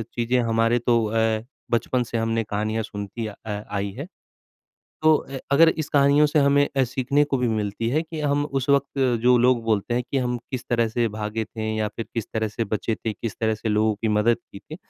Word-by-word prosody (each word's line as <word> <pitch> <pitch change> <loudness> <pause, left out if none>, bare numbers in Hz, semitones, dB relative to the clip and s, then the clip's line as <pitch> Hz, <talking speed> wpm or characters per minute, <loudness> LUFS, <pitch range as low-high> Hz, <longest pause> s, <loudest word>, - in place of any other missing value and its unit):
चीज़ें 120 +1 +1
हमारे 115 +1 +2
तो 120 -1 +2
अ, 110 0 0 0.3
बचपन 120 +2 +1
से 115 0 -4
हमने 115 0 0
कहानियाँ 110 +1 -2
सुनती 105 +2 -6
अ, 105 - -7
आई 105 -1 -3
है, 140 - -4 1.0
तो 155 0 +6
अ, 135 -1 -7
अगर 160 +4 +7
इस 155 -2 -3
कहानियों 140 +1 +4
से 150 +1 +2
हमें 145 0 +4
अ, 135 - +4
सीखने 135 +4 +1
को 145 -2 -1
भी 125 -1 0
मिलती 110 +1 -1
है 150 +6 +1
कि 160 -1 -7
हम 145 0 +1
उस 135 -2 -3
वक़्त 140 0 +2 0.2
जो 125 0 +6
लोग 125 -1 +3
बोलते 110 +1 0
हैं 125 +1 0
कि 140 - +1
हम 125 -1 0
किस 130 -2 -4
तरह 115 -1 +2
से 120 +1 0
भागे 105 +1 -2
थे 110 -1 -4
या 110 -1 0
फिर 115 - -4
किस 115 -3 -3
तरह 110 -1 0
से 110 +2 -3
बचे 110 +2 -2
थे, 110 - -4
किस 115 0 -5
तरह 110 -1 +1
से 110 +1 -4
लोगों 105 0 +2
की 110 - -2
मदद 105 +2 +3
की 100 - -9
थी, 155 - -10
115 Hz, 220 wpm, -24 LUFS, 110-135 Hz, 1.0 s, अगर